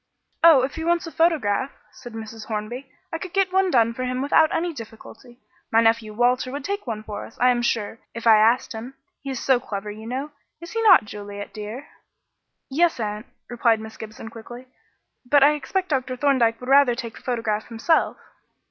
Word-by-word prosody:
"Oh, 320 -6 +8
if 265 - -2
he 320 - -3
wants 340 +1 +1
a 330 - -7
photograph," 280 -9 +1 0.2
said 240 -2 -12
Mrs. 225 0 -8
Hornby, 230 +5 -5 0.2
"I 325 - -2
could 370 0 -8
get 385 -1 +1
one 380 0 +3
done 230 -6 +3
for 255 - -5
him 255 0 -2
without 310 +2 +4
any 340 +1 -1
difficulty. 230 0 -12 0.3
My 225 - +5
nephew 225 -1 +2
Walter 250 +3 +1
would 280 0 -5
take 400 -6 -4
one 215 -2 -4
for 210 -1 -6
us, - - -13
I 250 - +5
am 240 -1 0
sure, 230 -2 -1 0.2
if 230 - -6
I 225 -2 +7
asked 230 +4 +3
him. 235 +4 -8 0.3
He 275 - -7
is 265 -2 -3
so 260 -2 +3
clever, 210 -2 -6
you 220 +2 -10
know 270 +5 -4 0.3
is 340 +1 -10
he 455 - -2
not, 430 - +7
Juliet, 205 -1 -8
dear?" 220 +6 -7 0.8
"Yes, 325 +1 +1
aunt," 210 +1 -4 0.2
replied 235 -2 +2
Miss 220 0 -9
Gibson 220 +1 -9
quickly, 240 +3 -10 0.6
"but 280 +2 +4
I 290 - +7
expect 370 +6 -3
Dr. 260 -3 -1
Thorndyke 245 -5 +2
would 250 - -7
rather 275 -3 +5
take 235 -2 -6
the - - -13
photograph 225 -4 -2
himself." 240 +8 +1
245 Hz, 200 wpm, -23 LUFS, 225-280 Hz, 0.8 s, Oh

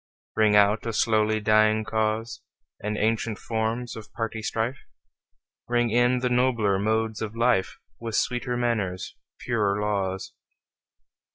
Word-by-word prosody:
Ring 110 -1 +4
out 105 +3 +4
a 115 - -2
slowly 110 0 +2
dying 110 0 +3
cause, 110 +1 -2 0.4
And 105 +1 -2
ancient 110 0 0
forms 115 +2 -2
of 110 -1 -10
party 110 -1 -3
strife; 115 +4 -2 0.9
Ring 120 -1 +1
in 120 +2 +3
the 125 - +1
nobler 120 -6 +2
modes 110 +1 0
of 110 0 -4
life, 115 -5 +2 0.2
With 115 -2 -4
sweeter 125 +1 0
manners, 110 -7 -2 0.2
purer 105 -4 0
laws. 100 -2 -2
110 Hz, 125 wpm, -26 LUFS, 105-115 Hz, 0.9 s, Ring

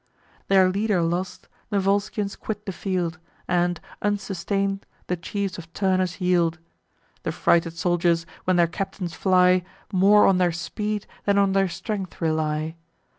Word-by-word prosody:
Their 190 -1 +5
leader 200 -1 +1
lost, 175 +3 -2 0.2
the 205 - 0
Volscians 200 +1 0
quit 210 -1 -5
the 195 - -3
field, 180 -3 -2 0.3
And, 175 -1 +1 0.2
unsustain'd, 195 -1 -1 0.2
the 180 - -1
chiefs 190 +2 -4
of 165 -1 -11
Turnus 185 -1 0
yield. 175 -3 +2 0.6
The - - -2
frighted 165 -1 +2
soldiers, 170 -1 +1 0.2
when 185 - +3
their 175 -1 +5
captains 180 0 -4
fly, 185 -1 +4 0.3
More 200 +3 +6
on 190 -2 +4
their 175 -2 +2
speed 210 +5 -3 0.2
than 200 -1 +3
on 200 -1 +4
their 195 -1 +2
strength 195 -1 -5
rely. 155 0 -1
185 Hz, 140 wpm, -24 LUFS, 170-200 Hz, 0.6 s, More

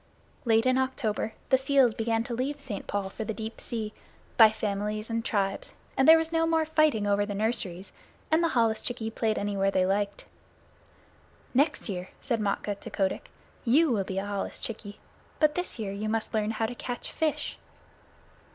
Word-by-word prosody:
Late 225 0 +4
in 255 0 +4
October 225 -4 -1 0.2
the 265 - +5
seals 265 -3 +4
began 225 +1 0
to 240 - -5
leave 270 +5 -2
St. 245 -8 -6
Paul's 195 -1 -2
for 220 - -4
the 220 0 -4
deep 220 0 -6
sea, 220 -3 -4 0.4
by 225 -2 +9
families 215 +1 -2
and 230 0 -1
tribes, 195 -3 -1 0.2
and 265 - +3
there 320 +1 +10
was 325 0 -1
no 325 0 +2
more 325 -1 +2
fighting 310 -9 +3
over 205 0 +2
the 205 0 -3
nurseries, 200 -4 -1 0.4
and 320 +2 +4
the - - +4
holluschickie 225 0 0
played 220 -2 0
anywhere 200 -1 +1
they 185 -1 +2
liked. 200 +1 -1 1.3
"Next 285 +4 +2
year," 185 -3 -4
said 235 -4 -1
Matkah 205 0 -1
to - - -7
Kotick, 195 -2 -1 0.3
"you 285 +5 +4
will 205 -4 +1
be 190 0 -5
a 195 - -1
holluschickie; 205 +1 -4 0.4
but 305 -1 +4
this 360 -3 -3
year 210 -4 -3
you 210 +2 -3
must 225 +1 -2
learn 215 -1 +1
how 225 0 0
to 220 - -3
catch 245 0 -5
fish." 315 -1 -1
220 Hz, 180 wpm, -28 LUFS, 205-260 Hz, 1.3 s, there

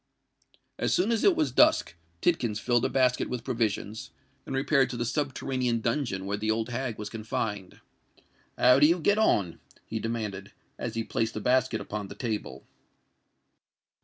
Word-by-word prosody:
As - - +1
soon 200 +6 +2
as 230 -1 +1
it 390 - +5
was 320 -2 +1
dusk, 310 - +4 0.3
Tidkins 120 -11 +1
filled 120 +1 +1
a - - +1
basket 130 -1 +2
with 125 -2 -4
provisions, 110 -4 -2 0.4
and 135 - -3
repaired 135 -1 +2
to 120 - -5
the 120 - -1
subterranean 130 -3 -1
dungeon 115 -5 -1
where 100 +1 -2
the 110 +1 -2
old 110 +2 0
hag 120 -1 -3
was 105 - -5
confined. 105 -3 -4 0.8
"How 125 +1 +6
do 145 - +7
you 170 +3 +2
get 205 +6 +2
on?" 100 - +2 0.3
he 110 - -4
demanded, 105 -3 -4 0.3
as 115 -1 -4
he 115 - -1
placed 110 0 -2
the - - -2
basket 130 +3 +1
upon 105 -1 -5
the - - -10
table. 105 - -4
120 Hz, 165 wpm, -28 LUFS, 105-135 Hz, 0.8 s, do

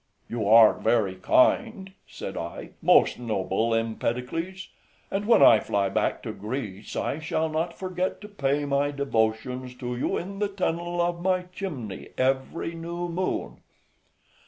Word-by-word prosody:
"You 110 -3 -2
are 110 0 +8
very 110 -4 +1
kind," 225 - +2 0.2
said - - -7
I, - - -6
"most - - +4
noble 110 0 0
Empedocles, 125 +11 -3 0.4
and 200 +2 -2
when 235 - +6
I 110 - +8
fly 100 -1 0
back 95 - -1
to - - -4
Greece, 105 -2 -6
I 150 - -2
shall 160 0 -1
not 165 +2 -2
forget 185 -1 -2
to 210 - -8
pay 145 -7 -1
my 140 0 +1
devotions 125 -2 -1
to 125 -1 -4
you 120 - -1
in 195 +3 -6
the 205 - +1
tunnel 175 -3 -2
of 170 0 -1
my 185 0 +1
chimney 135 - -6
every 135 +6 0
new 170 +1 -5
moon." 180 +2 -2
145 Hz, 145 wpm, -26 LUFS, 115-180 Hz, 0.4 s, are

